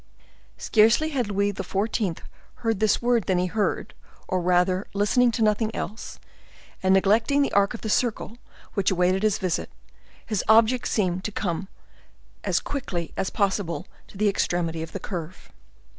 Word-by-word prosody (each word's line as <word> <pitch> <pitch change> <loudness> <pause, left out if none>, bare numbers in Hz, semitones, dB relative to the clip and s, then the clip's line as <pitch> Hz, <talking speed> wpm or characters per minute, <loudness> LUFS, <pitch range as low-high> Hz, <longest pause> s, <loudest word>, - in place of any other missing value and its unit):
Scarcely 225 +8 +3
had 255 -8 -1
Louis 200 0 0
XIV. 200 -2 -2 0.3
heard 225 -4 -1
this 215 +2 +2
word 240 -3 +2
than 185 - +1
he 180 - +1
heard, 205 +3 -1 0.3
or 185 -1 0
rather 180 +2 +2
listening 240 +5 +3
to 225 - 0
nothing 215 +1 +2
else; 215 +5 -6 0.6
and 190 0 +4
neglecting 225 +9 +3
the - - -1
arc 200 +3 +3
of - - -9
the - - -4
circle 235 0 -1 0.3
which 200 -4 +1
awaited 185 +1 +2
his 215 -2 +2
visit, 180 -3 -2 0.6
his 215 -4 -1
object 225 +3 +5
seemed 185 -3 0
to 210 - -2
be - - -25
to - - -2
come 185 -1 -2 0.8
as - - +1
quickly 185 - -4
as 190 - -1
possible 195 -4 -1 0.2
to - - -14
the 210 +1 +2
extremity 175 -4 0
of 160 - -6
the 195 - -5
curve. 180 -2 -7
200 Hz, 165 wpm, -25 LUFS, 185-225 Hz, 0.8 s, object